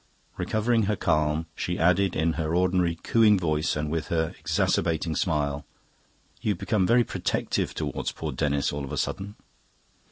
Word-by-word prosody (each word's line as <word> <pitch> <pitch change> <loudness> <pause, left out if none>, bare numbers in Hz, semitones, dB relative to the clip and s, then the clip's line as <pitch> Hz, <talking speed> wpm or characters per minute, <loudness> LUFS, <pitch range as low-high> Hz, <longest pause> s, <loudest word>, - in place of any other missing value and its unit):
Recovering 110 -1 +1
her 105 - +2
calm, 75 -2 +1
she 90 +3 -3
added 90 +2 +3
in 80 +1 +1
her 80 0 -1
ordinary 90 -1 +2
cooing 110 -3 +5
voice 80 -4 0
and 75 0 -2
with 80 -1 -2
her 80 +1 0
exacerbating 80 0 0
smile, 75 -3 0 0.8
"You've 105 -4 0
become 100 -2 +1
very 120 +1 +5
protective - - -2
towards - - -3
poor - - -5
Denis 70 -1 0
all 70 0 -3
of 70 - -6
a - - -3
sudden." 100 +2 -3
85 Hz, 155 wpm, -26 LUFS, 75-95 Hz, 0.8 s, cooing